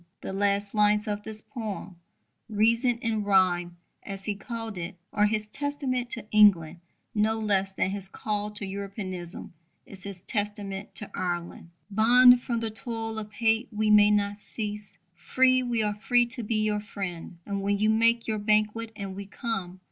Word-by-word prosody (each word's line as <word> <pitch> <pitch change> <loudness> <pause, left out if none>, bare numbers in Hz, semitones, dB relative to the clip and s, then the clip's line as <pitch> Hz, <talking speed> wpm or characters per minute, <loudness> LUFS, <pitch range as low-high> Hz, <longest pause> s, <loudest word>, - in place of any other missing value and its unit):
The - - -5
last 200 0 0
lines 210 0 +3
of 205 0 -2
this 215 0 -6
poem 205 -6 -6 0.5
Reason 230 +3 +2
in 220 -2 0
Rhyme, 180 -3 +2 0.2
as 195 -1 -6
he 210 - 0
called 225 -1 -6
it 175 +3 -5 0.2
are 210 0 +4
his 215 0 -1
testament 270 -1 -2
to 235 - -3
England 180 -6 +5 0.3
no 220 0 +1
less 195 -3 0
than 190 0 -1
his 195 -1 -3
call 210 +1 -3
to 210 -1 0
Europeanism 190 -3 -6 0.3
is 190 -2 -10
his 195 -2 -8
testament 205 -2 -4
to 210 - -5
Ireland: 175 -1 -4 0.2
Bond, 245 +4 +7
from 235 -2 -2
the 225 -1 -2
toil 225 +1 -2
of 210 -1 -8
hate 225 +2 +1
we 215 0 +1
may 210 0 +7
not 205 0 +1
cease: 210 -1 -5 0.2
Free, 255 +8 +3
we 240 -3 0
are 210 -1 0
free 240 +4 +2
to 240 +1 -6
be 225 0 -2
your 210 -1 +1
friend. 190 -5 -6
And 200 -1 -3
when 200 +1 +1
you 215 +1 +3
make 230 +1 +3
your 215 -1 -1
banquet, 215 +2 +1
and 195 -2 -6
we 200 0 -7
come. 195 -5 -4
210 Hz, 170 wpm, -27 LUFS, 195-225 Hz, 0.5 s, Bond